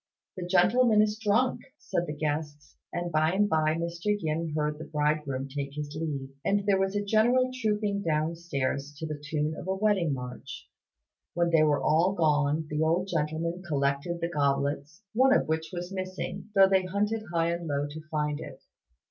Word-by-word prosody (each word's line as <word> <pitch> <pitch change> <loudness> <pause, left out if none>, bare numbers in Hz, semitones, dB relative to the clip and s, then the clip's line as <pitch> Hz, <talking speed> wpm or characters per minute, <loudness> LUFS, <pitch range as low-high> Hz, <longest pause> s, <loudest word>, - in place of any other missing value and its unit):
"The 180 -1 -5
gentleman 215 +5 +4
is 215 0 -1
drunk," 225 +4 +2 0.2
said 175 -10 -2
the 150 - -4
guests; 150 -1 -3 0.2
and 175 0 -3
by 155 +2 +2
and 205 +2 +3
by 155 -3 +2
Mr. 170 +5 -1
Yin 160 -2 -2
heard 150 0 -1
the 160 - -6
bridegroom 150 -3 -1
take 140 0 -5
his 150 0 -5
leave, 145 -4 -4
and 200 0 +1
there 200 -2 +3
was 195 +1 0
a 205 0 -1
general 240 +5 +3
trooping 210 -2 0
downstairs 155 -4 -2
to 160 - -5
the 150 -2 -5
tune 150 +1 -1
of 175 - -8
a 190 - 0
wedding 195 -5 +2
march. 125 -2 -6 0.7
When 170 0 +2
they 165 -2 +5
were 150 -2 +3
all 170 +5 +3
gone 150 -2 +2
the 150 0 -2
old 170 +4 +1
gentleman 165 +2 -1
collected 140 +3 -1
the 170 - +1
goblets, 145 +3 -1
one 260 +4 +5
of - - +1
which 160 0 -1
was 180 +1 -5
missing, 185 +1 -5
though 195 -1 +8
they 190 -1 +3
hunted 210 +4 -1
high 170 0 +1
and 170 0 -4
low 145 -1 0
to 155 +2 -8
find 150 -1 -1
it. - - -10
165 Hz, 180 wpm, -28 LUFS, 150-190 Hz, 0.7 s, though